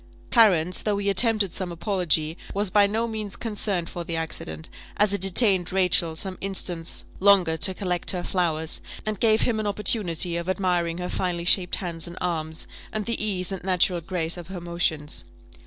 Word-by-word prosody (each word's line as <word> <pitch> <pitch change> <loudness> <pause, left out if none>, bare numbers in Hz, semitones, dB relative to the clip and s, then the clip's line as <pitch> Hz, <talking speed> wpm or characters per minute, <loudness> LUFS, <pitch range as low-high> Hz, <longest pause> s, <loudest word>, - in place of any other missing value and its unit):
Clarence, 185 -7 +4
though 210 -2 0
he 200 0 0
attempted 210 -2 +3
some 185 -2 -3
apology, 170 -3 0 0.2
was 200 -1 +1
by 205 -1 +5
no 225 +3 -1
means 215 -3 -4
concerned 205 -6 -2
for 175 - -6
the 165 0 -4
accident, 80 - -5 0.3
as 205 -1 +3
it 200 - -1
detained 195 -2 +3
Rachel 180 -3 +2
some 185 +3 -4
instants 180 -4 -4 0.2
longer 190 -4 +4
to 185 +3 +3
collect 180 -3 -1
her 180 -2 +2
flowers, 160 -3 -1 0.2
and 215 -2 -3
gave 220 -1 +3
him 225 -3 +1
an 215 - -2
opportunity 185 -5 +1
of 170 +1 -4
admiring 180 -3 0
her 180 0 -4
finely 175 -2 -2
shaped 180 0 +6
hands 170 -3 -3
and 170 - -10
arms, 160 -3 -3 0.3
and 215 -1 -3
the 230 -2 -2
ease 190 -3 -2
and 190 -2 -5
natural 180 -1 +2
grace 170 -1 -1
of 175 -2 -9
her 190 -1 -7
motions. 160 - -2
180 Hz, 180 wpm, -24 LUFS, 170-200 Hz, 0.3 s, shaped